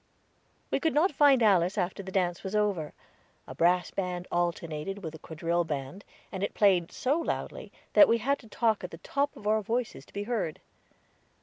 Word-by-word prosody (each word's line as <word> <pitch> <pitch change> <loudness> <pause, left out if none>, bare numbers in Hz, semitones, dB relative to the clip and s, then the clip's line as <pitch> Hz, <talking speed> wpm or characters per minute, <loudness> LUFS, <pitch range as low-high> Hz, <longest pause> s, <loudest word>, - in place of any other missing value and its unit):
We - - +1
could 320 -3 0
not 335 +6 +4
find 275 -4 +5
Alice 190 -2 +3
after 185 +1 -1
the 190 -1 -8
dance 180 -2 0
was 195 +1 -4
over. 200 -8 0 0.5
A - - -8
brass 175 +1 +2
band 180 -2 -3
alternated 175 +2 -2
with 160 -1 -5
the 160 - -10
quadrille 170 +1 -1
band, 150 +4 -5 0.3
and 190 - -5
it 200 - -2
played 185 -5 +3
so 280 +5 0
loudly 330 - -4 0.2
that 300 - +8
we 230 - +3
had 275 +5 0
to 230 - -15
talk 220 -1 0
at 180 - -4
the 165 - -10
top 280 - -2
of 210 - -13
our 215 +1 +2
voices 225 - -3
to - - -22
be 200 - -3
heard. 215 -8 -2
195 Hz, 195 wpm, -29 LUFS, 175-225 Hz, 0.5 s, that